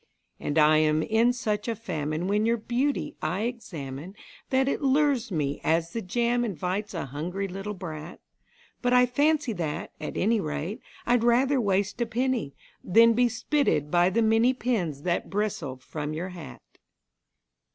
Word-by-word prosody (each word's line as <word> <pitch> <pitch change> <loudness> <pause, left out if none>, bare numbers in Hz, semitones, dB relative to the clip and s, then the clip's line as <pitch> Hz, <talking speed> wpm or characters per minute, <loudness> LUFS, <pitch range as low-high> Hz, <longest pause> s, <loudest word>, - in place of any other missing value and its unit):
And 145 - -2
I 155 0 +6
am 155 0 +2
in 225 +2 +3
such 215 -4 -2
a 230 - -1
famine 155 -6 -3
when 210 +2 +2
your 230 +1 +2
beauty 245 +6 -1
I 175 +6 -1
examine 180 - -5 0.3
That 265 0 +2
it 275 - -1
lures 275 -4 +2
me 145 -4 -1
as 165 +1 +1
the 230 - -2
jam 240 +5 0
invites 195 0 -3
a 165 - -3
hungry 170 +9 -4
little 195 +3 -5
brat; 160 -3 -7 0.6
But 245 0 +2
I 250 0 +6
fancy 285 +1 +1
that, 160 -6 -4
at 150 - -5
any 220 +3 +2
rate, 160 - -4 0.2
I'd 240 -1 +3
rather 255 +3 +3
waste 200 +2 0
a 235 - +1
penny 240 - -1 0.3
Than 230 +5 +6
be 245 +1 +3
spitted 240 - 0
by 175 +1 +4
the 230 +5 +1
many 225 +4 +3
pins 180 - -1
that 175 -1 -1
bristle 195 -10 -2
from 150 +3 -5
your 175 +4 -4
hat. 175 -3 -10
205 Hz, 160 wpm, -27 LUFS, 160-240 Hz, 0.6 s, I